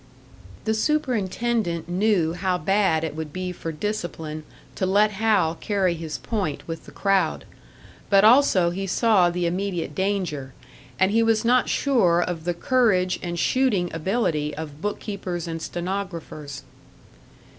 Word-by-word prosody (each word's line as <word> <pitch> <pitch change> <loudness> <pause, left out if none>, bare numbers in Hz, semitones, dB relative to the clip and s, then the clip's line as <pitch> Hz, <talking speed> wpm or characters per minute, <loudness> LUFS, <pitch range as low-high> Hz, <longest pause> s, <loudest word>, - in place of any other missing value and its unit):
The 220 - +1
superintendent 225 - 0
knew 180 -3 +1
how 180 +1 0
bad 180 -2 +2
it 155 -2 -3
would 155 -1 -5
be 185 +2 -4
for 165 -2 -5
discipline 160 -4 -4 0.3
to 185 - -1
let 205 +3 +4
Hal 200 -5 +2
carry 190 0 0
his 160 -4 -5
point 150 - -3
with 165 -1 -6
the - - -11
crowd; 195 -1 +1 0.6
but 195 -1 +5
also 215 -7 +5
he 195 +2 -4
saw 195 -2 +3
the 175 0 -2
immediate 175 -3 -2
danger 170 -8 -2 0.4
and 190 +1 +3
he 225 +2 +3
was 225 0 +2
not 250 +1 +3
sure 210 -12 +3
of 175 -2 -2
the 175 -1 -1
courage 190 -4 +2
and 175 -1 -4
shooting 210 -4 +1
ability 165 -4 -1
of 150 -1 -7
book 205 0 -2
keepers 180 -5 -5
and 165 -1 -4
stenographers. 170 -7 -5
185 Hz, 145 wpm, -24 LUFS, 165-210 Hz, 0.6 s, but